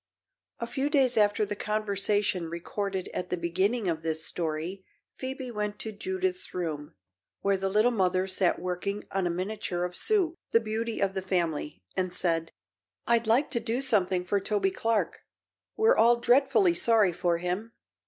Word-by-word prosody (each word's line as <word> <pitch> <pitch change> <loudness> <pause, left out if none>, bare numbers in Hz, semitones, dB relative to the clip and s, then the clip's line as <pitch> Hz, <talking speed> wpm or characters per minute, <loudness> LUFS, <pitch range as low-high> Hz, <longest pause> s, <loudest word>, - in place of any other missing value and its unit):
A 235 - -3
few 265 +4 -1
days 270 -5 +3
after 210 0 +3
the 205 0 -4
conversation 205 -4 0
recorded 190 +3 -3
at 180 - -4
the 180 - -1
beginning 190 +6 0
of 160 -2 -1
this 160 0 -2
story 170 +3 -3 0.3
Phoebe 260 -1 -5
went 210 -1 -3
to 220 - -3
Judith's 375 - -2
room, 155 - -4 0.5
where 200 0 +2
the 195 0 -1
Little 215 +5 +3
Mother 185 -4 +1
sat 185 -1 +1
working 185 +3 -3
on 190 -2 0
a - - 0
miniature 185 0 -2
of 180 0 -3
Sue 380 - +2 0.2
the 230 - +7
beauty 225 +1 -3
of 195 -1 +1
the 190 - -2
family 165 - -2
and 185 -1 0
said: 165 -2 0 0.5
"I'd 235 -1 +2
like 250 +7 +3
to 240 - 0
do 230 +2 -1
something 190 -8 +2
for 200 +2 +1
Toby 195 -1 0
Clark. 225 +1 0 0.6
We're 445 +3 +5
all 240 +1 +6
dreadfully 240 -6 +4
sorry 210 0 +3
for 175 0 +1
him." 180 +6 -3
200 Hz, 165 wpm, -28 LUFS, 180-230 Hz, 0.6 s, the